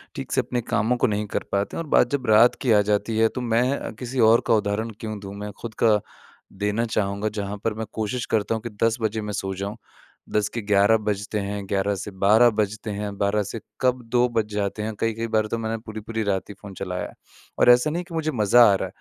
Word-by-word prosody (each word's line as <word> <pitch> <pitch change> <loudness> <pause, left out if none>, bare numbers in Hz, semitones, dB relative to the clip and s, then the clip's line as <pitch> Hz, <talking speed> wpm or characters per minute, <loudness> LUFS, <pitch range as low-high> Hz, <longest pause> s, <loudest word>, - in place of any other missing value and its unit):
ठीक - - -6
से - - +3
अपने 120 -1 -3
कामों 115 +2 0
को - - +2
नहीं 105 0 -1
कर - - 0
पाते 100 +1 -1
हैं 165 - -2
और 155 - -12
बात 120 - +4
जब 140 -3 -2
रात 110 +3 +6
की 125 - +1
आ 105 -1 +6
जाती 105 +2 0
है, 110 0 +5
तो 125 - -5
मैं 125 +3 0
किसी 125 0 -4
और 115 +1 +6
का - - +4
उदाहरण 105 +1 0
क्यों 110 -2 -5
दूँ? 100 0 -8
मैं 105 0 -6
खुद 115 -2 -6
का 110 -2 +5 0.6
देना 105 +3 +1
चाहूँगा। 105 -1 -1
जहाँ 100 +1 -4
पर 115 - 0
मैं 110 +1 -4
कोशिश 115 +2 -2
करता 110 +1 0
हूँ 110 - -4
कि 120 - -4
10 115 +1 +3
बजे 110 0 -1
मैं 105 -1 -5
सो 95 0 -3
जाऊँ। 100 +3 -5 0.5
10 105 -1 0
के 115 - -2
11 105 +2 +4
बजते 105 0 -2
हैं, 100 0 -4
11 100 +1 0
से 100 +2 -6
12 105 +5 +5
बजते 105 0 -2
हैं, 100 0 -4
12 100 +1 +1
से 100 +3 -6 0.2
कब 125 -1 +2
2 125 +1 +3
बज 115 -2 0
जाते 105 +1 -2
हैं। 110 - -3
कई-कई 115 0 -1
बार 110 -1 +1
तो 115 - -2
मैंने 115 0 -2
पूरी-पूरी 110 +1 -4
रात 100 -1 -1
ही - - -7
फ़ोन 100 -2 -9
चलाया 90 -2 -3
है, - - -14 0.5
और - - +5
ऐसा 125 +4 +6
नहीं 165 +3 -2
है - - -4
कि - - -9
मुझे 155 -1 -1
मज़ा 120 -1 +5
आ - - +4
रहा - - -2
110 Hz, 245 wpm, -24 LUFS, 100-115 Hz, 0.6 s, रात